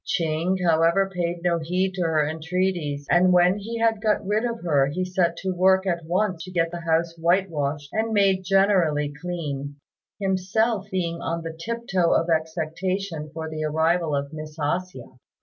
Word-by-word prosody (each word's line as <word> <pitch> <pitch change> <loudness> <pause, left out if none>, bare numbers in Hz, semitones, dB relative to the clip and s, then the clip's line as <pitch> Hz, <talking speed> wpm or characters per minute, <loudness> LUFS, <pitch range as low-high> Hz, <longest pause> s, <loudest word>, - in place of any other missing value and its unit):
Ching, 165 +3 0
however, 170 +4 +3
paid 175 -1 -2
no 170 -1 +2
heed 180 +4 -1
to 190 - -4
her 160 -3 +2
entreaties, 160 -2 -2
and 180 +1 +5
when 180 +2 +4
he 230 +3 -5
had 225 -2 +1
got 210 -2 +1
rid 210 +4 0
of 235 -1 -3
her 145 -5 +3
he 180 +6 -2
set 180 -2 0
to 190 -1 -1
work 190 +1 +3
at 170 -3 -1
once 180 0 0
to 185 - -9
get 165 -2 0
the 175 - -5
house 165 0 +1
whitewashed 155 -5 0
and 220 +1 0
made 195 -3 +3
generally 175 -7 +2
clean, 145 -5 -4 0.4
himself 195 +2 0
being 170 -3 -2
on 165 0 -3
the 165 -1 -6
tip 230 +8 -4
toe 180 -3 +2
of 165 +1 +1
expectation 160 +1 -2
for 160 +1 -5
the 155 0 -4
arrival 160 +1 +1
of 140 +1 -3
Miss 155 0 -8
A 150 +3 +1
hsia. 130 -8 -13
175 Hz, 180 wpm, -24 LUFS, 160-190 Hz, 0.4 s, and